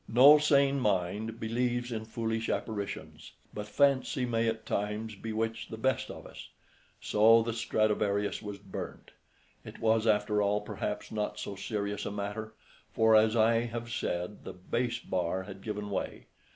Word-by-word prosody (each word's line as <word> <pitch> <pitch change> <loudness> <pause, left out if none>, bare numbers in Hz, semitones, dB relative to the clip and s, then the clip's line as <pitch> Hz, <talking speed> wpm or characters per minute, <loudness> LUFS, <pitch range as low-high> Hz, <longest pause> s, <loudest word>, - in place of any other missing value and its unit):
No 140 +6 +8
sane 140 -2 +3
mind 105 +1 -1
believes 120 +2 -1
in 110 -1 -3
foolish 115 0 -2
apparitions, 100 -8 -4 0.2
but 105 0 -5
fancy 135 -1 +2
may 115 -1 0
at 110 0 -2
times 105 +2 -2
bewitch 110 +2 -3
the 110 - -6
best 130 +4 0
of - - -9
us. - - -11 0.5
So 115 +2 +5
the 115 0 -2
Stradivarius 105 -3 0
was 105 -2 -6
burnt. 100 -1 -8 0.5
It - - -10
was, 110 0 +2
after 105 0 +2
all, 105 +1 +1
perhaps 105 0 -4
not 105 -1 -2
so 100 - -5
serious 100 +1 -3
a - - -3
matter, 105 +2 -5 0.4
for, 110 0 +4
as 110 +1 +5
I 115 +1 +4
have 120 0 -5
said, 90 -2 -3
the - - -7
bass 120 +6 -2
bar 95 +1 -2
had 95 0 -10
given 105 -1 -4
way. - - -3
110 Hz, 155 wpm, -30 LUFS, 105-115 Hz, 0.5 s, No